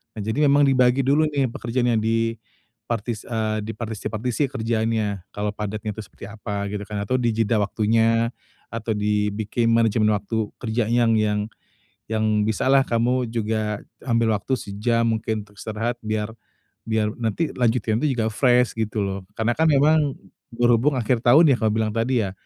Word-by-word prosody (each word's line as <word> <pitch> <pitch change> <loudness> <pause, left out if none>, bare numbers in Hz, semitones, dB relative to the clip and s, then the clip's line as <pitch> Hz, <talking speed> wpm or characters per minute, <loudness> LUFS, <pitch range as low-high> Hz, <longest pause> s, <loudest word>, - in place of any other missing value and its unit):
Nah, 110 - -5
jadi 110 +6 -2
memang 145 +1 +5
dibagi 130 -1 +3
dulu 145 +4 +3
nih, 140 -5 0
pekerjaan 120 +2 -1
yang 115 - +2
di 115 0 0 0.5
partis 115 -1 -3
eee, 110 -2 -1
dipartisi-partisi 110 +4 -3
kerjaannya, 110 -4 -1
kalau 105 0 -1
padatnya 105 +1 -4
itu - - -9
seperti 100 - -12
apa, 105 -2 -4
gitu 105 0 -4
kan, 105 -1 -4
atau 115 +6 -1
di 120 -2 +1
jeda 115 0 +1
waktunya, 115 +3 +2 0.4
atau 115 -1 -2
dibikin 105 +2 0
manajemen 110 -2 +3
waktu 105 +2 -1 0.2
kerjanya 120 +1 +1
yang - - +4
yang 105 -1 +1 0.7
yang 110 -1 0 0.2
bisalah, 130 +5 +3
kamu 120 +2 +1
juga 110 -2 -2 0.2
ambil 115 -3 +2
waktu 130 - -4
sejam 115 +4 0
mungkin 110 -1 -3
untuk 105 -1 -23
istirahat 110 +2 -2
biar 110 0 -2 0.6
biar 110 -1 +1
nanti 120 +8 -1
lanjutinnya 115 -2 +1
itu 135 -4 0
juga 110 -1 +1
fresh, 125 0 +3
gitu 110 -1 -1
loh. 100 -1 -2 0.2
Karena 110 +2 +1
kan, 160 +1 +3
memang, 145 0 +3 0.4
berhubung 120 +4 +3
akhir 120 0 +1
tahun 135 +8 +6
ya, - - +3
kamu 110 -1 +2
bilang 110 -1 0
tadi 115 +1 +1
ya, 95 - -4
115 Hz, 165 wpm, -23 LUFS, 110-120 Hz, 0.7 s, tahun